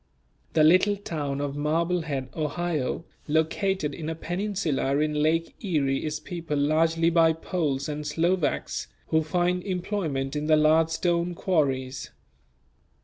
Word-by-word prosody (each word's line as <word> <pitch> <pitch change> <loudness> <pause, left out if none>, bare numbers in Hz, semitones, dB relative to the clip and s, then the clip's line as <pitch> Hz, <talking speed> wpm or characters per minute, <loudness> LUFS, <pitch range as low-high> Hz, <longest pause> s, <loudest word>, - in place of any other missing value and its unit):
The 155 - +4
little 185 +6 +5
town 145 -8 -3
of 145 -1 -3
Marblehead, 155 -2 -1
Ohio, 160 -1 -2 0.2
located 160 +1 0
in 155 +2 -5
a 165 - -3
peninsula 175 -6 -1
in 150 0 +1
Lake 165 +2 +1
Erie 145 -8 0
is 150 -1 -2
peopled 165 -2 -4
largely 165 +3 +2
by 165 -1 +5
Poles 155 -5 -2
and 150 0 -4
Slovaks 165 - 0 0.2
who 160 - +3
find 180 +3 0
employment 175 -8 -2
in 150 +1 -2
the 155 -1 +5
large 155 +1 +4
stone 170 +1 0
quarries. 135 -8 -1
160 Hz, 130 wpm, -26 LUFS, 150-175 Hz, 0.2 s, little